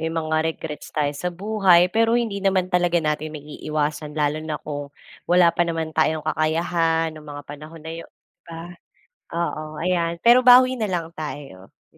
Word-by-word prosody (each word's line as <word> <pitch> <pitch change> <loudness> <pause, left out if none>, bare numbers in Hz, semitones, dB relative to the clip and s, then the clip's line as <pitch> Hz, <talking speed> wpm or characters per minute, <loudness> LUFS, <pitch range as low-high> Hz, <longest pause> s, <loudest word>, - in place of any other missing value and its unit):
may 160 - -1
mga 160 -1 -1
regrets 155 -1 -6
tayo 145 -1 -1
sa 180 +5 -3
buhay, 185 -2 +3
pero 230 +1 +3
hindi 215 -4 -2
naman 190 -2 +1
talaga 175 -1 +2
natin 155 -1 -2
maiiwasan, 150 0 -4
lalo 150 0 0
na 155 -1 -3
kung, 145 -1 -6 0.4
wala 175 -1 +5
pa 175 - +1
naman 165 -2 -3
tayong 155 -1 +1
kakayahan 165 +1 0
nung 155 -1 -12
mga 145 0 -8
panahon 155 +3 -10
na 160 - -6
'yon, 165 - -9 0.4
ba. 165 +1 -8 0.6
Oo, 155 -2 -4
ayan, 170 -1 0
pero 245 +2 +6
bawi 255 +1 +7
na 220 - -1
lang 170 -3 -2
tayo, 140 -11 -8 0.2
'di - - -29
165 Hz, 170 wpm, -22 LUFS, 155-175 Hz, 0.6 s, bawi